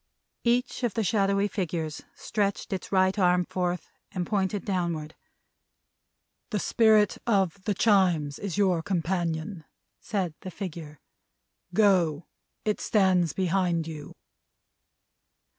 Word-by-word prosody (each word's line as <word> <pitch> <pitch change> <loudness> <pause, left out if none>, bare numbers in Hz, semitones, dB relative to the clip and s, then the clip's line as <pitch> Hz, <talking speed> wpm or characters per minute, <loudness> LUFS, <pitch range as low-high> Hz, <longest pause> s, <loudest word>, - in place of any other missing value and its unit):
Each 245 +2 +1
of 240 -5 -1
the 225 - +1
shadowy 200 0 +2
figures 170 -6 -3
stretched 200 -2 -2
its 190 - -5
right 190 +1 +3
arm 180 -1 +3
forth, 180 0 -3 0.2
and 180 -2 -2
pointed 195 0 -1
downward. 170 -5 -2 1.4
"The 215 - -1
Spirit 215 0 +3
of 195 -3 +1
the 205 - 0
Chimes 180 -9 +2
is 200 -2 -4
your 185 -5 +3
companion," 170 -1 -2 0.4
said 190 -6 -2
the 185 - -6
figure. 165 -6 -7 0.8
"Go! 180 -7 +3 0.4
It 210 -1 0
stands 185 -6 +2
behind 180 -3 +1
you!" 155 -3 -8
185 Hz, 110 wpm, -27 LUFS, 170-200 Hz, 1.4 s, right